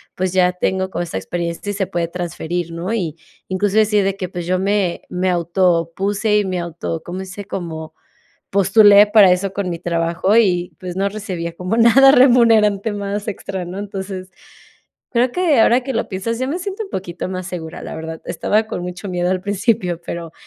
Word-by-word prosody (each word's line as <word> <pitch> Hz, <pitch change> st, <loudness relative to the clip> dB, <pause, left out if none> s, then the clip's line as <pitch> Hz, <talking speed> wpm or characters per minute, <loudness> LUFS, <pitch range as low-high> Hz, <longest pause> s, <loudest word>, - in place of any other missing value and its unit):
pues 185 Hz, -1 st, -1 dB
ya 180 Hz, -1 st, +3 dB
tengo 190 Hz, +1 st, -1 dB
como 175 Hz, -, -2 dB
esa 165 Hz, -, -5 dB
experiencia 170 Hz, -, -4 dB
y -, -, -4 dB
se 195 Hz, -2 st, -2 dB
puede 175 Hz, -3 st, -2 dB
transferir," 175 Hz, -1 st, -4 dB
¿no? 180 Hz, +6 st, -3 dB
Y, 170 Hz, -7 st, -2 dB, 0.3 s
incluso 200 Hz, +3 st, +1 dB
así 210 Hz, -1 st, +2 dB
de 195 Hz, 0 st, 0 dB
que, 185 Hz, -2 st, -4 dB
pues, 175 Hz, -2 st, -5 dB
yo 185 Hz, +1 st, 0 dB
me 195 Hz, -2 st, 0 dB
me 185 Hz, +1 st, -1 dB
autopuse 180 Hz, +4 st, +1 dB
y 205 Hz, -, +1 dB
me 185 Hz, -1 st, -2 dB
auto 170 Hz, -1 st, -4 dB
¿cómo 180 Hz, +2 st, -6 dB
dice? 190 Hz, +2 st, -7 dB
como 160 Hz, -5 st, -6 dB, 0.6 s
postulé 200 Hz, +1 st, +6 dB
para 205 Hz, -4 st, +7 dB
eso 190 Hz, +1 st, -1 dB
con 195 Hz, -1 st, -3 dB
mi 170 Hz, -, -4 dB
trabajo 170 Hz, +4 st, 0 dB
y, 180 Hz, -6 st, +2 dB
pues, 180 Hz, -2 st, -6 dB
no 200 Hz, +1 st, +1 dB
recibía 185 Hz, -5 st, -5 dB
como 180 Hz, +5 st, -2 dB
nada 245 Hz, +4 st, +7 dB
remunerante 225 Hz, -5 st, +4 dB
más 205 Hz, 0 st, -4 dB
extra, 190 Hz, -2 st, -4 dB
¿no? 185 Hz, +3 st, -6 dB
Entonces, 190 Hz, -2 st, -6 dB, 0.8 s
creo 240 Hz, +1 st, +3 dB
que 330 Hz, -9 st, +3 dB
ahora 245 Hz, +3 st, +4 dB
que 265 Hz, +1 st, -4 dB
lo -, -, -1 dB
piensas, 215 Hz, +4 st, -3 dB
ya 255 Hz, -, -1 dB
me 335 Hz, +5 st, -2 dB
siento 395 Hz, +4 st, -4 dB
un -, -, -12 dB
poquito 180 Hz, -1 st, -5 dB
más 185 Hz, -1 st, -5 dB
segura, 165 Hz, -3 st, -7 dB
la -, -, -7 dB
verdad. 160 Hz, 0 st, -7 dB
Estaba 215 Hz, +2 st, +1 dB
con 180 Hz, -, -4 dB
mucho 180 Hz, +2 st, -6 dB
miedo 180 Hz, 0 st, 0 dB
al 185 Hz, -, 0 dB
principio, 200 Hz, -3 st, 0 dB
pero 170 Hz, -1 st, -6 dB
190 Hz, 195 wpm, -19 LUFS, 175-210 Hz, 0.8 s, para